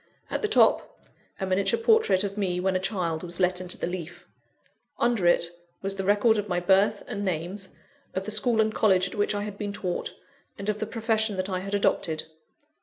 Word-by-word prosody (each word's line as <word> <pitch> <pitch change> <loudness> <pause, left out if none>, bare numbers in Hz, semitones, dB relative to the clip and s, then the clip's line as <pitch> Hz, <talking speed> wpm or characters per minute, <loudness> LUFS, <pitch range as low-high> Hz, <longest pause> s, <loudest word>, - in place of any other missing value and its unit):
At - - -1
the 430 - +1
top, - - +2 0.3
a 190 - -1
miniature 195 - +1
portrait 445 - +4
of 200 -1 -3
me, 185 -4 -1
when 190 +1 0
a - - +2
child, 180 -5 -2
was 175 0 -5
let 180 0 +2
into 180 -1 -3
the - - -2
leaf. 175 -1 -6 0.7
Under 230 -7 +2
it, 170 0 +3 0.3
was 195 0 -2
the 195 - -3
record 210 +3 +3
of 205 0 -4
my 175 -1 +1
birth 200 +3 +3
and 205 -4 -4
names, 185 +2 -3 0.5
of 190 - -1
the 215 - -5
School 220 +2 +2
and 215 0 0
College 190 -4 +3
at - - -9
which 205 -1 0
I 205 - -2
had 205 -1 -7
been 205 -1 -3
taught, 180 -3 -3 0.4
and 200 +1 -4
of 210 0 -1
the 215 - -2
profession 220 -2 0
that 185 +1 -2
I 185 -1 -1
had 195 +2 -3
adopted. 170 -5 0
195 Hz, 210 wpm, -26 LUFS, 185-210 Hz, 0.7 s, portrait